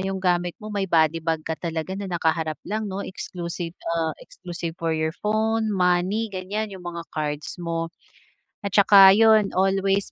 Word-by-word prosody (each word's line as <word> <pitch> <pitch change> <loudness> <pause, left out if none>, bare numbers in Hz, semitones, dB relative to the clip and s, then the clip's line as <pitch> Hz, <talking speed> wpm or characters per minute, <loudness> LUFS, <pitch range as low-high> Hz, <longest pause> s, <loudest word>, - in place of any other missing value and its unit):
yung 190 0 -2
gamit 180 -2 0
mo 215 -1 -9
may 195 -2 -1
body 165 -1 +3
bag 160 -1 -2
ka 160 - -2
talaga 165 +1 -3
na 195 0 -5
nakaharap 160 -2 0
lang 215 0 -3
'no, 195 +1 -4
exclusive 175 -2 -6
ah, 165 -2 -1
exclusive 175 -2 -7
for 165 -1 0
your 160 0 -1
phone, 220 +2 0
money, 190 +3 +1
ganyan 200 +3 -4
yung 190 - -9
mga 170 -1 -6
cards 150 +2 -4
mo. 165 -1 -3 0.7
At 200 -3 -4
saka 195 -1 +8
'yon, 220 -2 +4
always 195 +1 +1
185 Hz, 165 wpm, -24 LUFS, 165-200 Hz, 0.7 s, saka